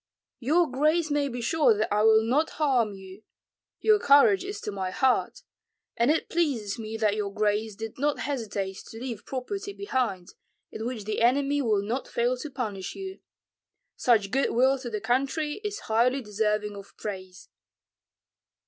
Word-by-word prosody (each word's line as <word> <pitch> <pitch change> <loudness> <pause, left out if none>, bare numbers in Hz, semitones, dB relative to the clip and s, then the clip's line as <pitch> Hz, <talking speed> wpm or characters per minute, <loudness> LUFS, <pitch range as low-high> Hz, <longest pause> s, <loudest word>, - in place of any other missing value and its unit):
"Your 315 +7 +3
grace 305 +4 +1
may 290 -1 +1
be 245 -1 -5
sure 245 -3 +3
that 215 -1 0
I 210 - +2
will 220 0 +5
not 280 +8 +1
harm 250 -9 +2
you; 190 +1 -12 0.6
your 430 -1 +5
courage 355 +6 +5
is 400 +2 -5
to 210 - -4
my 190 -2 -3
heart. 260 +7 +1 0.5
And 235 +3 +2
it 315 - +1
pleases 260 -12 -1
me 220 0 -5
that 215 -2 +2
your 205 -2 -2
grace 210 +1 0
did 225 +3 -7
not 295 +1 +1
hesitate 205 -8 -3
to 225 - -9
leave 235 -4 -6
property 395 +11 -4
behind, 245 - -2 0.4
in 220 +2 -4
which 240 -4 -4
the 215 +2 -2
enemy 280 +4 +3
will 215 -6 +1
not 235 +6 -3
fail 240 +2 0
to 300 +5 -6
punish 210 -8 -4
you. 385 0 -7 0.8
Such 215 -5 +2
good 270 +1 +2
will 265 +3 +3
to 250 -2 -6
the 210 -2 -4
country 275 - -1
is 415 0 -4
highly 250 +4 +1
deserving 210 0 -1
of 200 0 -12
praise." 190 -2 -7
240 Hz, 165 wpm, -27 LUFS, 210-285 Hz, 0.8 s, will